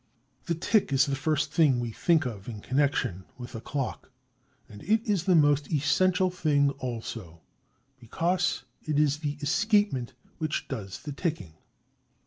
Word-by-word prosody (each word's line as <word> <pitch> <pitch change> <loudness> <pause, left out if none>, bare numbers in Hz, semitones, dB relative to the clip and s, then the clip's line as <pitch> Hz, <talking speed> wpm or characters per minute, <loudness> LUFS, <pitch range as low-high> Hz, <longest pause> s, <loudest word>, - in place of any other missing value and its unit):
The 170 - -1
tick 195 +2 +1
is 135 +1 +4
the 140 -2 -1
first 150 +1 0
thing 145 -7 +4
we 120 -1 -3
think 160 +5 +2
of 110 -4 -6
in 110 -3 -6
connection 130 -7 0
with 120 -1 -9
a 115 - -6
clock; 135 0 -4 0.6
and 105 -1 -12
it 220 +4 +1
is 195 -5 +1
the 185 - +4
most 145 -2 +3
essential 180 +5 +2
thing 145 -5 +2
also, 115 -9 -6 0.6
because 175 +10 0 0.2
it 150 -2 -2
is 150 -1 +2
the 145 -2 -3
escapement 170 - +1 0.3
which 155 -1 -2
does 105 -8 -6
the 150 - -5
ticking. 150 - -3
145 Hz, 150 wpm, -28 LUFS, 125-165 Hz, 0.6 s, is